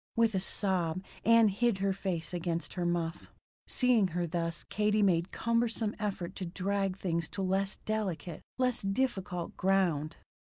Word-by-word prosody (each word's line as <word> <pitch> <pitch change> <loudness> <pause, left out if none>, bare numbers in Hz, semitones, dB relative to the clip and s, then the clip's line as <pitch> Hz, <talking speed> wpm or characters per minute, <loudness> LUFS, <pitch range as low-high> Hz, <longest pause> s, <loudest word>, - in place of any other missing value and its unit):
With 230 -1 +3
a 190 - +2
sob, 185 -2 0 0.2
Ann 230 -1 +6
hid 220 +1 +1
her 195 0 +1
face 185 -3 -3
against 170 -1 -2
her 175 -2 -1
muff. 170 -1 -2 0.4
Seeing 245 -6 +3
her 175 0 -1
thus, 165 0 -2
Katie 210 0 +1
made 175 -2 +2
cumbersome 230 -2 0
effort 190 -4 -3
to 185 - -3
drag 195 +1 -1
things 170 -3 -1
to 195 - -3
less 195 +1 0
delicate, 190 -6 -2 0.2
less 250 -2 +1
difficult, 195 -5 -1
ground. 180 -6 +1
190 Hz, 145 wpm, -31 LUFS, 175-210 Hz, 0.4 s, Ann